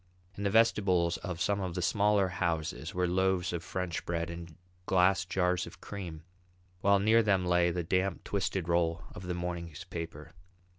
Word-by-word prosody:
In - - -7
the 100 - +2
vestibules 100 -6 +3
of 90 -4 -5
some 100 +1 +1
of 90 -2 -3
the 90 - -1
smaller 100 0 +3
houses 85 -2 -2
were 90 0 +1
loaves 95 0 +1
of 85 -1 -3
French 90 -1 -3
bread 85 -1 -2
and 85 -1 -8 0.3
glass 95 0 +3
jars 90 -1 0
of - - -12
cream, 85 -6 -7 0.6
while 100 +1 +4
near 110 +3 +5
them 100 -4 +2
lay 90 0 +3
the 85 0 -2
damp 95 +2 0
twisted 95 -3 -2
roll 85 -1 +1
of 90 - -8
the 90 - -2
morning's 85 -1 -5
paper. 85 -5 -7
90 Hz, 170 wpm, -31 LUFS, 85-95 Hz, 0.6 s, near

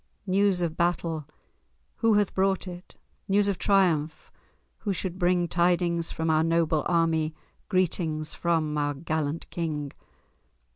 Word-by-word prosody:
News 190 -1 +2
of 165 -2 -2
battle! 165 -3 -1 0.7
Who 225 -2 +3
hath 205 -2 +2
brought 190 0 +1
it? 180 0 -9 0.3
News 200 +1 +3
of 200 -3 -1
triumph! 170 -6 +1 0.5
Who 205 - -2
should 185 0 -4
bring 175 0 +2
Tidings 170 -1 +1
from 160 - -3
our 155 0 +3
noble 165 -2 +2
army, 165 -2 +1 0.3
Greetings 160 -4 0
from 160 -3 0
our 145 0 0
gallant 155 +1 -3
King? 150 -4 -3
170 Hz, 130 wpm, -27 LUFS, 155-185 Hz, 0.7 s, Who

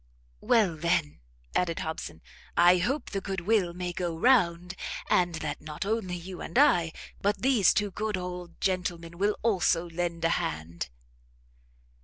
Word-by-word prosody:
"Well, 210 -8 +3
then," 150 - 0 0.4
added 170 -2 +1
Hobson, 160 - -5 0.3
"I 175 +1 +6
hope 265 - -1
the 195 - -2
good 190 -1 -3
will 195 -2 +2
may 180 0 -4
go 170 -2 -3
round, 180 -6 +3 0.4
and 175 -2 +3
that 150 -2 -4
not 155 +5 -5
only 205 -4 -1
you 180 +1 -8
and - - -4
I, 175 - +5 0.3
but 200 +1 0
these 250 -8 +5
two 205 -2 0
good 215 +1 -2
old 180 -1 -6
gentlemen 175 -2 -2
will 205 +1 +1
also 180 -6 +2
lend 170 0 -2
a - - +4
hand." 80 0 -4
180 Hz, 150 wpm, -28 LUFS, 170-200 Hz, 0.4 s, I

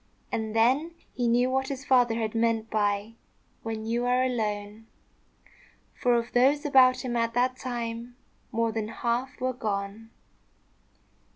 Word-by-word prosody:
And 220 -1 -3
then 270 +9 +2 0.2
he 245 -1 -1
knew 245 +2 +3
what 265 0 0
his 275 0 -5
father 245 -4 +4
had 220 -2 -2
meant 225 -1 0
by 205 0 0 0.5
"when 220 -1 -5
you 235 +2 -1
are 250 +1 +3
alone;" 215 -3 -3 1.1
for 245 -1 +2
of 235 0 -1
those 275 +5 +3
about 255 -2 +5
him 240 -1 -2
at 230 0 0
that 255 +1 +2
time, 240 -1 -5 0.4
more 230 -1 0
than 220 -1 -3
half 240 +3 -2
were 255 0 -1
gone. 210 -1 -4
235 Hz, 145 wpm, -27 LUFS, 225-255 Hz, 1.1 s, about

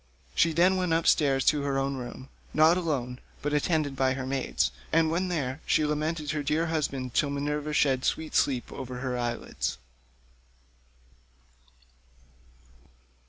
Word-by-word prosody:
She 165 - +3
then 180 +4 +4
went 180 -3 0
upstairs 145 -5 +3
to 150 -2 +3
her 140 -1 -1
own 135 0 0
room, 130 +1 -8 0.3
not 155 +2 +6
alone, 135 -8 -2 0.2
but 145 0 -1
attended 150 -1 +1
by 130 0 +2
her 130 -1 -4
maidens, 135 0 0 0.2
and 160 0 +3
when 180 +3 0
there, 145 -5 -2
she 155 - +2
lamented 150 0 -1
her 155 -1 -2
dear 150 +3 0
husband 140 -6 -2
till 145 - +2
Minerva 150 +1 -2
shed 135 -3 +2
sweet 160 -1 -1
sleep 130 -4 +1
over 125 -1 -6
her 130 -1 -2
eyelids. 120 - -3
145 Hz, 140 wpm, -28 LUFS, 130-160 Hz, 0.3 s, not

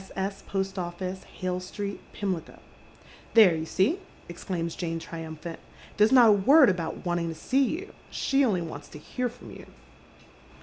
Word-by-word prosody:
S., 195 +1 -3
Post 195 0 -2
Office, 180 +2 -5
Hale 185 -1 -3
Street, 200 +2 -5
Pimlico." 185 -5 -4 0.4
" - - -23
There, 215 -6 +8
you 160 0 -4
see," 235 - +2 0.3
exclaims 170 -1 -4
Jane, 165 -2 -3
triumphant. 165 0 -7 0.2
" - - -20
There's 210 +2 +5
not 245 -4 +8
a - - +8
word 255 +6 +6
about 170 0 -4
wanting 175 -1 0
to 165 - -5
see 265 - +1
you. 360 +10 -4 0.2
She 275 0 +1
only 195 -9 +1
wants 150 -3 -8
to - - -10
hear 250 +11 -3
from 245 +1 -13
you." - - -11
185 Hz, 170 wpm, -27 LUFS, 170-215 Hz, 0.4 s, There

